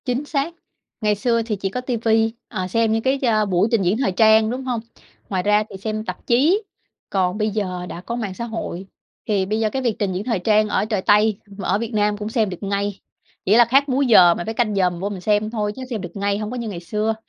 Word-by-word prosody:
Chính 255 +2 -1
xác, 290 +3 -2 0.5
ngày 210 -1 +2
xưa 230 +2 +1
thì 225 -1 -2
chỉ 195 -1 -3
có 250 +6 -4
TV, 240 -3 -3 0.4
ờ, 185 -4 -3
xem 225 +3 +1
những 225 0 +1
cái, 265 +1 +1
ơ, 220 -5 +2
buổi 185 +1 +2
trình 230 -3 +3
diễn 190 +3 +1
thời 255 -7 +1
trang, 220 +2 +5
đúng 255 +3 -4
hông? 250 -3 -2 0.5
Ngoài 185 -2 -1
ra 210 +1 +3
thì - - -8
xem 215 +2 -4
tạp - - -7
chí, 310 - +3 0.5
còn 185 0 0
bây 215 0 0
giờ 185 -4 -3
đã 170 - -7
có 235 +5 -5
mạng 215 -6 -3
xã 235 +5 -5
hội, 205 -5 -5 0.4
thì 200 -3 +1
bây 215 +3 -1
giờ 220 -1 +1
cái 265 +4 -3
việc 235 -4 0
trình 200 -3 0
diễn 185 +2 -3
thời 230 -4 -1
trang 215 +3 +3
ở 210 - +1
trời 215 -3 -1
Tây 210 +1 +3 0.2
mà 195 - -4
ở - - +2
Việt 230 +2 -5
Nam 210 -1 +1
cũng 210 +1 -4
xem 220 -3 +1
được 180 +1 -8
ngay, 200 0 -2 0.5
chỉ 200 - +4
là 240 0 +7
khác 275 +4 +3
múi 270 +2 +2
giờ 180 -7 +7
mình 175 - -5
phải 225 - -2
canh 215 -2 0
giờ 185 -2 +3
mình 175 -1 -8
vô 200 +3 -2
mình 195 -3 -6
xem 210 +2 +1
thôi, 210 -2 -2
chứ - - -8
xem 225 -5 -3
được 175 -2 -7
ngay, 200 0 0
hông 215 +1 -4
có 250 - -4
như 235 -2 -4
ngày 185 -4 -5
xưa. 215 +5 -1
215 Hz, 265 wpm, -21 LUFS, 195-230 Hz, 0.5 s, là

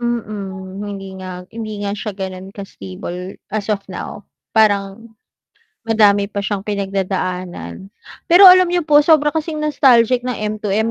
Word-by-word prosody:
Mm, 200 -5 -5
hindi 200 -2 -7
nga 180 -1 -7
hindi 215 -2 -6
nga 200 - -2
siya 210 +1 -5
ganun 190 -1 -6
ka-stable 180 - -8 0.2
as 215 -1 -3
of 205 -2 -1
now. - - -7 0.3
Parang 210 +1 +1 0.7
madami 205 -3 +4
pa 200 0 -4
siyang 200 -1 -3
pinagdadaanan. 190 - -4 0.3
Pero 350 +4 +6
alam 370 0 +6
niyo 350 0 0
po 300 -2 +5
sobra 300 -2 +5
kasing 310 0 -3
nostalgic 255 -4 +3
ng 250 - -1 0.2
M2M 215 +2 0
205 Hz, 140 wpm, -18 LUFS, 195-235 Hz, 0.7 s, Pero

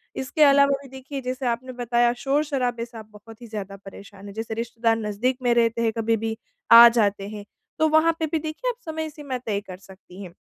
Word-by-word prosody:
इसके 280 +4 +1
अलावा 280 -1 +5
भी, 275 - -12
देखिए, 265 +2 -7
जैसे 255 +1 -4
आपने 240 +2 -3
बताया, 240 -1 +1
शोर-शराबे 270 -4 -1
से 235 -1 -13
आप 220 - -9
बहुत 215 +2 -15
ही 240 - -10
ज़्यादा 205 -3 -6
परेशान 195 0 -12
हैं। 200 - -9
जैसे 225 +1 -5
रिश्तेदार 230 0 -1
नज़दीक 225 +4 -2
में 245 -1 +3
रहते 230 0 +1
हैं, 225 -1 +1
कभी 225 0 +1
भी 220 0 -4 0.3
आ 235 +1 +11
जाते 205 -4 0
हैं। 210 -1 -8 0.3
तो 315 - +4
वहाँ 315 +2 +4
पे 320 - 0
भी 320 - 0
देखिए, 315 +11 -4
आप - - -3
समय 315 -1 -4
सीमा 285 -4 -6
तय 215 -5 -3
कर 185 - -8
सकती 190 0 -15
हैं। 175 -3 -11
235 Hz, 220 wpm, -24 LUFS, 220-275 Hz, 0.3 s, आ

